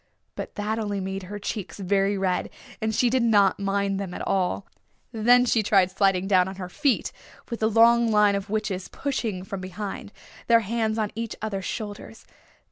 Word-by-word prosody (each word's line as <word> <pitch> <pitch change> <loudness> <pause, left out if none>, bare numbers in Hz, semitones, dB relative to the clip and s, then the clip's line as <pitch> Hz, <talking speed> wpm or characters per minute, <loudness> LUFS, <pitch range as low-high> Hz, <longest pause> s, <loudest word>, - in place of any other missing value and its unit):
But - - -7
that 215 +2 -2
only 205 -2 -2
made 190 0 -4
her 205 - -5
cheeks 205 -1 -5
very 195 +1 +1
red, 190 -1 0 0.3
and 220 0 -1
she 250 - +3
did 255 +2 +2
not 205 -5 +4
mind 200 0 0
them 190 -3 -5
at - - -5
all. 190 0 0 0.5
Then 245 +2 +4
she 230 -2 +2
tried 195 -3 +3
sliding 195 -1 +2
down 185 -2 +4
on 190 - -6
her 185 -2 -7
feet, 280 - 0 0.4
with 235 - -3
the 220 - +2
long 230 +1 +5
line 210 -1 +4
of 200 0 -3
witches 205 -3 -2
pushing 225 -9 -3
from 190 0 -6
behind, 195 +2 -6 0.4
their 230 -1 +5
hands 220 +1 -1
on 215 -2 -1
each 230 0 -4
other's 200 -3 -4
shoulders. 215 0 -6
205 Hz, 185 wpm, -25 LUFS, 195-225 Hz, 0.5 s, long